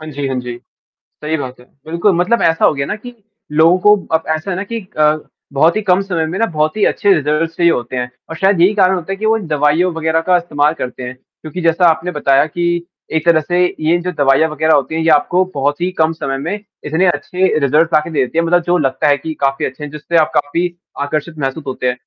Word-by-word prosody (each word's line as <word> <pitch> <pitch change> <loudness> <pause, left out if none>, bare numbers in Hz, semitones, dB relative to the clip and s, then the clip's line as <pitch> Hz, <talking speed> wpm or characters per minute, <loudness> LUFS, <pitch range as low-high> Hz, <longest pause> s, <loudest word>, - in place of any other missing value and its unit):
हाँ 155 - -9
जी, 145 0 -4
हाँ 130 -1 -2
जी। 125 -1 -6 0.7
सही 155 +1 -1
बात 130 -3 -6
है। 125 - -17 0.2
बिल्कुल 170 +5 +1
मतलब 190 +7 +1
ऐसा 165 0 +3
हो - - +4
गया 140 -1 -2
ना 210 - -3
कि 245 +3 -11 0.4
लोगों 160 +4 +4
को 210 +3 +6 0.2
अब 160 - -15
ऐसा 155 +5 -6
है - - -2
ना 190 - -2
कि 230 +2 -5 0.2
अ, 155 0 +3 0.4
बहुत 160 +5 +3
ही 215 - 0
कम 190 -1 +2
समय 180 -5 -2
में 165 +4 -4
ना 230 - +3
बहुत 155 -1 -1
ही 210 - +1
अच्छे 205 - +2
रिज़ल्ट्स 155 +1 -1
चाहिए 170 -1 +3
होते 125 -2 -3
हैं 125 0 -2 0.2
और 165 - -6
शायद 190 -1 +2
यही 190 +4 +5
कारण 190 -2 +3
होता 180 +1 -5
है - - -4
कि 220 - -4
वो 225 +1 +3
दवाइयों 155 0 +1
वग़ैरह 160 0 0
का 180 -1 +5
इस्तेमाल 150 -3 0
करते 125 -4 -6
हैं। 125 +1 -6
क्योंकि 155 +6 -10
जैसा 165 +2 +2
आपने 165 +2 -1
बताया 140 -2 +2
कि 170 +2 -2 0.3
एक 160 0 0
तरह 170 -2 +5
से 175 +4 -1 0.2
ये 160 +2 +2
जो 180 - -3
दवाइयाँ 145 0 +2
वग़ैरह 155 +1 +1
होती 140 +3 -1
हैं 165 - -1
ये 160 - +1
आपको 155 +5 +3
बहुत 145 +3 -1
ही 180 - 0
कम 160 0 +3
समय 135 -4 -4
में 160 +7 -3 0.3
इतने 160 +5 +1
अच्छे 185 +1 0
रिज़ल्ट्स 155 +4 +2
लाके 155 +2 +2
देती 150 0 -1
हैं 165 - +2
मतलब 175 +1 +3
जो 175 +1 +3
लगता 135 -1 0
है 145 -1 +4
कि 160 +3 -6
काफ़ी 135 0 0
अच्छे 130 +3 -7
हैं 150 - -5
जिससे 150 +3 -2
आप 155 -2 +3
काफ़ी 170 +5 0 0.3
आकर्षित 155 +2 -3
महसूस 135 +2 -3
होते 130 -1 -3
हैं। 125 - +1
160 Hz, 245 wpm, -16 LUFS, 145-175 Hz, 0.7 s, को